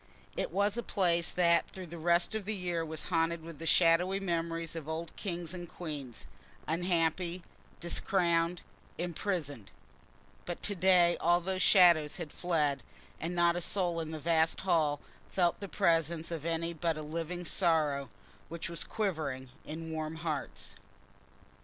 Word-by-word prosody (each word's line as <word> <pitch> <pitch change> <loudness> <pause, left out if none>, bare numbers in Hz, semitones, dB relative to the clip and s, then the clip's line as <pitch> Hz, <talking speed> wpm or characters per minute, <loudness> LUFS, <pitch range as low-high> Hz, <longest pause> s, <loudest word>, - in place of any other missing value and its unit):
It - - -1
was 200 +5 +1
a - - 0
place 175 -6 +2
that 170 -1 +3
through 185 -1 -8
the 170 0 -9
rest 170 +3 +2
of 220 -3 -3
the 215 +1 -1
year 175 -3 -2
was 160 -1 -4
haunted 165 -1 +1
with 165 -2 -9
the 165 - -5
shadowy 175 +4 +4
memories 165 -3 -2
of 160 -2 -6
old 160 +1 -4
kings 175 -4 -4
and 175 -2 -7
queens, 145 -8 -7 0.4
unhappy, 170 +1 0 0.4
discrowned, 170 -1 +1 0.3
imprisoned; 165 - -3 0.7
but 175 - -5
to 205 - +1
day 180 -2 +5
all 175 +1 +4
those 185 +1 -2
shadows 170 -7 +6
had 165 -4 -6
fled, 150 -6 0 0.4
and 170 +2 -3
not 170 0 +4
a 175 - -1
soul 175 -1 -1
in 160 -1 -4
the 160 -1 -5
vast 160 +1 +2
hall 155 -6 +2 0.3
felt 175 -2 +1
the 200 -1 -6
presence 165 0 +1
of 165 -1 -3
any 165 0 -1
but 165 -1 -1
a 155 - -5
living 165 +3 -4
sorrow, 155 -6 +2 0.4
which 170 +1 -5
was 170 - -1
quivering 150 - -2 0.2
in 160 +1 -6
warm 155 0 -3
hearts. 160 -3 -3
170 Hz, 155 wpm, -32 LUFS, 160-175 Hz, 0.7 s, shadows